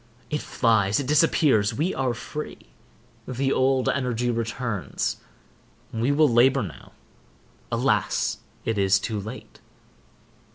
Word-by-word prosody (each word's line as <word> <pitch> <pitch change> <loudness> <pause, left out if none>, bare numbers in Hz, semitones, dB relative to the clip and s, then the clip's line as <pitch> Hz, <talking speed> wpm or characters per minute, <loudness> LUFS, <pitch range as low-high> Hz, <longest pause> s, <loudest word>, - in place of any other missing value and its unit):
It 150 - -1
flies—it 110 +1 +1
disappears—we 145 - +2
are 130 -3 -1
free. 150 +6 -6 0.7
The 135 +2 0
old 130 0 +2
energy 125 -3 0
returns. 115 -3 -2 0.8
We 115 +5 +1
will 150 +2 +4
labor 130 +2 +4
now. 90 - -10 0.8
Alas, - - +1 0.3
it 110 -2 0
is 100 0 +4
too 105 +2 -3
late! 110 +6 -9
125 Hz, 100 wpm, -25 LUFS, 110-135 Hz, 0.8 s, will